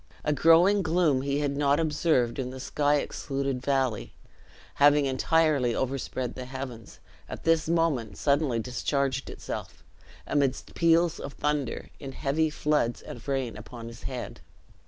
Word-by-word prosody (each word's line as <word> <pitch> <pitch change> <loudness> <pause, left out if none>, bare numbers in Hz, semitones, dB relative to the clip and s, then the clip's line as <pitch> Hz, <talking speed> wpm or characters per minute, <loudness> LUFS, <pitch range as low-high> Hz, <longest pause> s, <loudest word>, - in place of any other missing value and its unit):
A 150 - +1
growing 165 +7 +5
gloom 160 -5 +2
he 140 +1 -1
had 140 -1 -1
not 145 +1 +2
observed 150 -6 +1
in 130 -1 -2
the 130 +1 -8
sky 145 +2 +1
excluded 135 -2 -2
valley, 130 -5 -1 0.7
having 145 0 +6
entirely 135 -2 +2
overspread 130 -1 -2
the 130 - -7
heavens, 130 -4 -8 0.3
at - - -7
this 165 -1 +2
moment 165 -10 0
suddenly 140 -4 +1
discharged 130 +3 -1
itself, - - -7 0.4
amidst 140 -3 -1
peals 170 0 +3
of 140 - -6
thunder, 150 -4 -2
in 135 -2 -7
heavy 155 +4 0
floods 150 -6 0
of 120 - -10
rain 135 -4 -1
upon 115 -2 -9
his 115 - -12
head. 125 -3 -6
140 Hz, 140 wpm, -27 LUFS, 130-150 Hz, 0.7 s, having